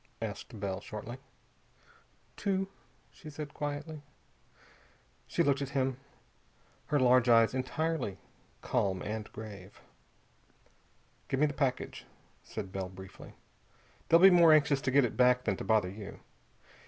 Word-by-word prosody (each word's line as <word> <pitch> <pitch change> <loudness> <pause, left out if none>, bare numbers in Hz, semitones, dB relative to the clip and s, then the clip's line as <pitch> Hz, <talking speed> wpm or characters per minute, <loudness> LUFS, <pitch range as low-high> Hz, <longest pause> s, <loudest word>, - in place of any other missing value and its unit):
asked 110 - -6
Bell 95 -1 -3
shortly. 110 +5 -7 1.2
"Two," 195 -1 -1 0.4
she 155 - -12
said 150 -1 -7
quietly. 145 +1 -5 1.3
She - - +1
looked 140 0 +2
at 140 - -3
him, 130 -1 0 0.9
her 145 - +2
large 125 -1 +4
eyes 115 -1 +5
entirely 130 - -2 0.5
calm 95 -2 0
and 105 0 -5
grave. 100 -3 -10 1.5
"Give 135 - -1
me 150 - +5
the 145 - -2
package," 135 -3 -2 0.3
said 95 - -7
Bell 95 -1 -4
briefly. 95 0 -12 0.8
"They'll 165 - +7
be 190 +2 +9
more 170 -2 +7
anxious 145 -2 +3
to 130 - -1
get 140 -1 +5
it 115 - -4
back 125 0 +4
than 100 - 0
to - - -5
bother 110 -4 +2
you. 100 +1 -9
130 Hz, 130 wpm, -31 LUFS, 105-145 Hz, 1.5 s, be